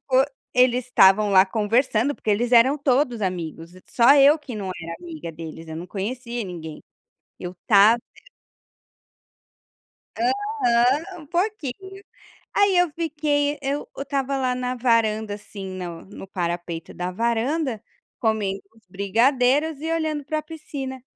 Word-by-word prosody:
pouco 265 +2 +3 0.2
eles 250 0 +3
estavam 205 -3 +5
lá 190 0 +6
conversando, 225 +5 +1
porque - - -9
eles 235 +4 +1
eram 250 +4 +5
todos 255 -5 +1
amigos, 170 -3 -4 0.2
só 245 +4 +5
eu 285 +2 +7
que 265 -6 -8
não 195 -3 -4
era 165 0 -6
amiga 320 - -7
deles, 160 0 -9
eu 160 - -6
não 175 +2 -7
conhecia 235 +5 -4
ninguém 160 -4 -8 0.6
eu 180 +1 -6
tava 215 +1 +6 2.2
Aham, 355 - +1
um 300 - -13
pouquinho, 380 - -3 0.5
aí 405 -2 +3
eu 355 -2 +3
fiquei, 295 -2 -1
eu 280 +1 -3
eu - - -4
estava 275 -1 -2
lá 255 -1 0
na 250 0 -2
varanda, 220 -3 +1
assim, 205 -1 -10
no 175 -3 -7
no 195 0 -11
parapeito 175 -2 -4
da 180 0 -4
varanda 235 - -1 0.4
comendo 210 -4 0 0.2
uns 225 - -24
brigadeiros 250 +9 +1
e 320 +1 -3
olhando 315 -3 -1
para 310 +2 -2
a - - -4
piscina. 285 -4 -7
245 Hz, 140 wpm, -23 LUFS, 200-290 Hz, 2.2 s, eu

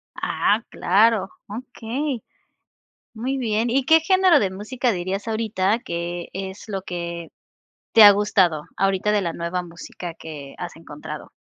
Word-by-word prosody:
Ah, 215 +3 +1
claro, 205 +1 +3 0.2
okey. 245 +3 -4 0.9
Muy 255 +5 -2
bien 230 -1 0
¿y 265 +2 +2
qué 320 +3 +6
género 370 -1 +5
de 195 -8 0
música 235 +6 -1
dirías 190 +2 -3
ahorita 220 -1 0
que 170 -2 -4
es 190 +1 -6
lo 195 -2 -3
que 170 -2 -5 0.6
te 225 - +8
ha 205 - +12
gustado 190 -6 +2
ahorita 195 +1 +1
de 210 -1 +2
la 170 -2 -2
nueva 170 +2 -3
música 170 0 -8
que 145 -4 -9
has 175 -1 -6
encontrado? 150 -2 -9
200 Hz, 140 wpm, -23 LUFS, 175-230 Hz, 0.9 s, ha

